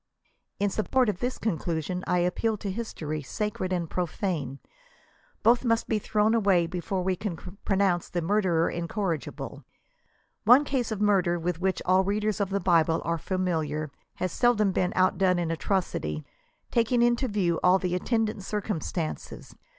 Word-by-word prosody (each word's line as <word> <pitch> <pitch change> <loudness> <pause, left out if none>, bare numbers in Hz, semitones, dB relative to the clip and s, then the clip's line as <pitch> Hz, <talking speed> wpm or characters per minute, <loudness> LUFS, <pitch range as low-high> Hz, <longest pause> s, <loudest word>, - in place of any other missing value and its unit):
In 200 0 +1
support 245 +4 +1
of 195 - -2
this 250 +1 -2
conclusion 175 -3 -2
I 180 - +2
appeal 180 +5 0
to 200 -1 -4
history, 160 -8 -4
sacred 190 +5 -3
and 175 -2 -1
profane. 165 -5 -2 0.9
Both 235 +3 +5
must 230 -2 +1
be 220 - +1
thrown 210 +1 +1
away 195 -6 +3
before 180 +2 -3
we 185 0 +1
can 190 -1 -4 0.3
pronounce 190 -3 +1
the 175 -2 -2
murderer 175 -3 +2
incorrigible. 170 -2 -3 0.8
One 250 +7 +7
case 255 -5 -1
of 210 -2 -3
murder 190 -4 +3
with 170 0 -3
which 190 0 0
all 185 +1 +4
readers 210 +1 0
of 200 -2 0
the 200 0 0
Bible 165 -3 +3
are 170 0 0
familiar, 160 -6 -2 0.2
has 185 -1 -2
seldom 220 -5 +3
been 180 0 0
outdone 185 0 +3
in 170 -2 -1
atrocity— 160 - -2 0.5
taking 235 +1 +3
into 240 +2 +2
view 190 -6 0
all 180 +1 +6
the 180 -2 -2
attendant 215 +2 0
circumstances. 190 -5 -4
185 Hz, 150 wpm, -27 LUFS, 170-210 Hz, 0.9 s, One